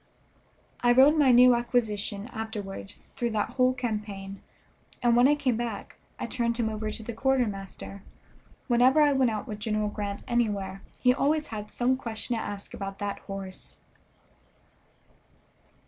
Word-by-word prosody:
I 240 0 +4
rode 270 +5 +7
my 290 -4 +5
new 250 +1 +8
acquisition 220 -4 -1
afterward 215 -4 -6 0.2
through 240 - -1
that 210 - 0
whole 255 -1 +3
campaign, 210 -6 -4 0.6
and 240 -1 +4
when 245 +2 +6
I 295 - +4
came 255 -5 0
away 230 -4 -3 0.3
I - - -3
turned 235 -2 -1
him 230 -2 0
over 215 0 -3
to 220 - -5
the 235 - -5
quartermaster. 215 -6 -2 0.7
Whenever 250 +3 +5
I 290 -1 +5
went 265 -3 +3
out 215 -2 -3
with 210 -3 -6
General 215 -1 -1
Grant 205 -1 -4
anywhere 205 -6 -1 0.2
he 250 -1 +4
always 300 +3 +1
had 210 -1 -5
some 255 +1 +1
question 235 -1 -4
to 225 - -2
ask 200 -1 -6
about 195 0 -5
that 205 -1 -3
horse. 195 -1 -7
225 Hz, 150 wpm, -28 LUFS, 205-250 Hz, 0.7 s, new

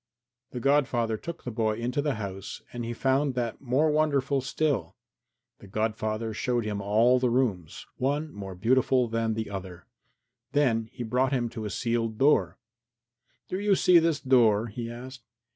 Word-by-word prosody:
The 125 - -6
godfather 125 -4 +2
took 170 +9 -7
the 125 - -4
boy 110 -1 0
into 120 +5 -1
the 145 -2 -1
house 100 -2 -6
and 120 -1 -4
he 115 - -4
found 135 +3 +1
that 120 -2 -3
more 140 +4 +2
wonderful 140 -3 +1
still. 140 +1 -1 0.6
The - - -13
godfather 110 +1 -2
showed 120 +1 -1
him 105 -1 -3
all 115 +5 +3
the 125 -1 +1
rooms 110 -10 -1
one 145 +4 -1
more 95 -2 -7
beautiful 125 +5 +2
than 115 -1 -1
the 110 -2 -4
other 95 -3 -7 0.7
then 115 -6 +2
he 120 - -6
brought 125 +4 +1
him 120 -3 0
to 110 -2 -6
a - - -3
sealed 115 +1 -1
door. 105 - +3 0.9
"Do 185 - -3
you 205 -1 +3
see 180 -2 +6
this 165 -2 +1
door?" 115 -5 +4
he 115 +2 -5
asked. 130 +2 -9
120 Hz, 165 wpm, -27 LUFS, 110-135 Hz, 0.9 s, see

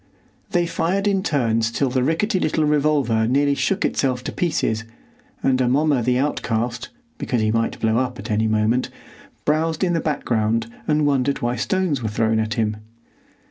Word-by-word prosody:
They 175 -1 +1
fired 170 +4 -1
in 195 -2 +2
turns 115 -9 +1
till 130 +2 0
the 130 0 +1
rickety 170 - +1
little 155 -2 +1
revolver 145 -7 +2
nearly 140 +3 +2
shook 195 +7 0
itself 125 -2 0
to - - -4
pieces, 110 -10 -1 0.6
and 130 -1 +2
Amomma 135 +2 +2
the 125 +2 +1
outcast—because 125 - -3
he 110 0 +1
might 115 0 -1
blow 110 0 +1
up 125 -1 -2
at - - -6
any 110 +1 +1
moment—browsed 130 - -1
in 175 -2 +2
the 165 - +1
background 115 -7 0 0.2
and 150 -1 +2
wondered 140 -2 +1
why 120 +1 0
stones 165 +2 0
were 110 - -2
thrown 110 +1 +1
at 110 -1 -1
him. 110 -1 0
130 Hz, 160 wpm, -21 LUFS, 115-155 Hz, 0.6 s, in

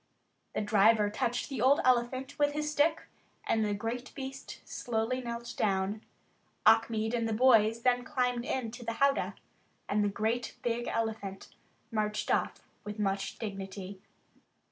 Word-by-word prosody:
The - - +1
driver 210 0 +4
touched 240 +3 -1
the 265 -5 -4
old 270 +3 +5
elephant 255 +2 +1
with 290 0 +3
his 300 0 -1
stick 305 +2 +2 0.4
and 220 - +2
the 205 -1 0
great 230 +4 -4
beast 270 -1 -7
slowly 240 +2 -2
knelt 235 -1 -5
down. 195 +1 0 0.6
Achmed 220 0 +4
and 230 -2 0
the - - 0
boys 225 -1 +4
then 245 -1 +3
climbed 250 -3 0
into 245 -1 -3
the 230 0 -2
howdah, 275 +3 +2 0.5
and 210 +1 +1
the 205 - +2
great 220 +4 -1
big 240 0 -1
elephant 220 -4 -3 0.4
marched 210 -1 -1
off - - -1 0.2
with 210 +1 -6
much 195 -2 -1
dignity. 195 -2 -6
230 Hz, 145 wpm, -31 LUFS, 210-250 Hz, 0.6 s, old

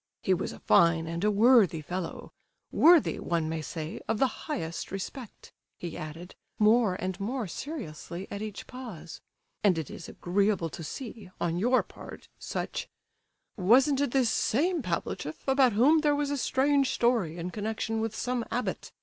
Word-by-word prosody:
"He 190 - +3
was 180 - -2
a - - -9
fine 170 -1 +4
and 170 +2 -4
a 210 - +4
worthy 210 -5 +5
fellow—worthy, 185 - +1
one 165 -2 -1
may 160 0 -2
say, 155 +1 -6
of 225 - 0
the 260 +3 -1
highest 170 - -3
respect," 215 +5 -7 0.3
he 170 -2 -6
added, 165 +4 -8 0.2
more 215 -2 +4
and 185 +1 -4
more 235 +4 -2
seriously 180 - -6
at 200 - -4
each 215 -2 -6
pause; 215 -11 -9 0.4
"and 190 -5 +4
it 160 -4 -4
is 170 - -8
agreeable 190 -1 0
to 165 - -7
see, 220 - -7
on 170 0 -1
your 245 +5 +3
part, - - -12
such—" - - -4 0.7
"Wasn't 260 +9 +4
it 285 - +1
this 250 -2 +2
same 330 +7 +1
Pavlicheff 170 - -4
about 265 -3 +4
whom 275 +10 +5
there 295 -1 +2
was 290 0 -1
a - - 0
strange 275 +1 +2
story 225 -9 +1
in 175 +1 -4
connection 220 +1 -2
with 225 -1 -2
some 250 -1 -1
abbot? 250 - -3
210 Hz, 160 wpm, -29 LUFS, 175-255 Hz, 0.7 s, worthy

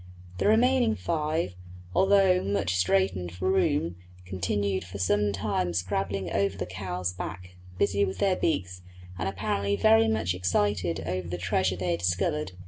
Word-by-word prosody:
The - - +2
remaining 235 +1 +4
five, 155 - -1 0.4
although 190 - +4
much 100 -2 0
straitened 90 -1 +1
for 95 +1 -1
room, 95 - +1 0.3
continued 95 +1 -1
for 90 +3 -8
some 105 +2 +1
time 95 -3 -1
scrambling 95 +1 -2
over 100 -1 0
the - - -3
cow's 90 -1 -4
back, 90 0 -7 0.2
busy 100 +1 +2
with 95 -1 -2
their 195 -2 +2
beaks 90 - -1 0.4
and 95 - -1
apparently 100 +1 -1
very 110 +3 +5
much 110 -6 0
excited 90 -1 0
over 90 +1 -3
the 90 +1 -4
treasure 90 +1 0
they 90 -1 -2
had 85 - -1
discovered. 90 - -1
95 Hz, 150 wpm, -27 LUFS, 90-105 Hz, 0.4 s, very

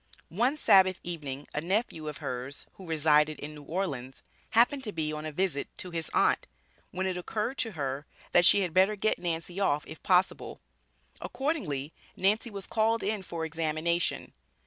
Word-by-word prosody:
One 245 - +1
Sabbath 190 -8 +5
evening 145 -5 -5
a 150 - -1
nephew 175 -3 -1
of 150 - -5
hers, 130 +3 -5
who 190 - -12
resided 150 -1 +3
in 150 +1 -6
New 150 - -10
Orleans, 140 -6 -4 0.3
happened 245 +4 +4
to 210 - -3
be 155 -4 -2
on 155 0 -4
a - - -4
visit 155 -3 -1
to 180 - -4
his 165 -1 -3
aunt, - - +2 0.4
when 185 +1 -3
it 185 -1 -1
occurred 215 +8 -3
to 225 -3 0
her, 140 -2 -3 0.2
that 175 - +6
she 200 - +7
had 180 -4 -2
"better 190 +4 +4
get 215 +2 0
Nancy 175 +1 -3
off 150 -7 +1
if 160 - -10
possible." 185 0 +1 0.6
Accordingly, 165 - -2 0.2
Nancy 210 +5 +1
was 200 -3 -7
called 225 +1 +1
in 210 0 -1
for 170 -3 -4
examination. 165 +1 -1
170 Hz, 170 wpm, -29 LUFS, 150-200 Hz, 0.6 s, she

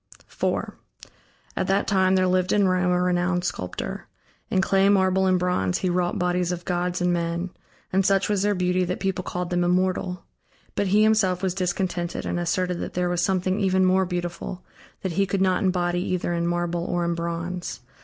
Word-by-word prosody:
IV - - 0 0.8
At - - -1
that 195 +1 +1
time 190 -1 +3
there 185 0 +3
lived 185 0 +1
in 205 -2 +3
Rome 180 -1 +2
a 180 - +2
renowned 180 0 +1
sculptor. 90 - -4 0.4
In 190 - +1
clay, 195 +1 +3
marble, 190 -1 +3
and 185 -1 +3
bronze 175 - 0
he 185 - -1
wrought 175 0 0
bodies 180 0 0
of 175 0 -5
gods 180 0 -1
and 180 0 +2
men, 170 +1 -2 0.4
and 190 +1 +3
such 195 0 +2
was 205 -2 +1
their 205 0 +2
beauty, 180 0 +1
that 180 0 -2
people 190 -1 -1
called 180 0 -4
them 175 0 +1
immortal. 180 0 0 0.5
But 200 - 0
he 205 +3 +4
himself 200 -4 +2
was 185 -2 +1
discontented 180 -1 -2
and 175 - -1
asserted 180 +1 -1
that - - -5
there 180 0 +1
was 175 -1 0
something 190 0 +1
even 190 -2 +3
more 190 +1 +3
beautiful, 175 0 -5 0.4
that 190 - -1
he 195 +4 +1
could 195 0 -1
not 185 0 +2
embody 175 -2 +1
either 180 -1 -1
in 170 0 0
marble 175 0 -1
or 175 0 -1
in 170 - 0
bronze. 170 -3 -4
180 Hz, 195 wpm, -24 LUFS, 175-190 Hz, 0.8 s, he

